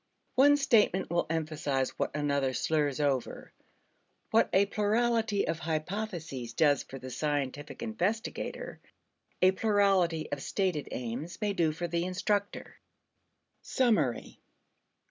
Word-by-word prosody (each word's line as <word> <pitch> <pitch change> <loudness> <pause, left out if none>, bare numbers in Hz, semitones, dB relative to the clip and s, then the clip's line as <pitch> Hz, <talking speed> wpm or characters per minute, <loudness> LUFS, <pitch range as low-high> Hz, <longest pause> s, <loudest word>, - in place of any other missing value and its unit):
One 285 +3 +6
statement 215 -10 +2
will 175 - +1
emphasize 150 -4 -1
what - - -3
another 140 -3 0
slurs 145 +2 0
over. 140 -4 -1 0.8
What - - +4
a 195 +2 +4
plurality 220 +1 +1
of 165 - -1
hypotheses 160 - -4
does 145 0 +3
for 135 - -9
the 130 -1 -8
scientific 145 - -3
investigator, 220 0 -3 0.6
a 185 - +7
plurality 190 -5 +2
of 145 -1 -3
stated 185 -5 -1
aims 125 +8 -5
may 210 -2 0
do 165 -4 +2
for 175 +3 -4
the 170 0 -1
instructor. 200 +3 -2 0.8
Summary. 210 - 0
170 Hz, 115 wpm, -30 LUFS, 145-205 Hz, 0.8 s, a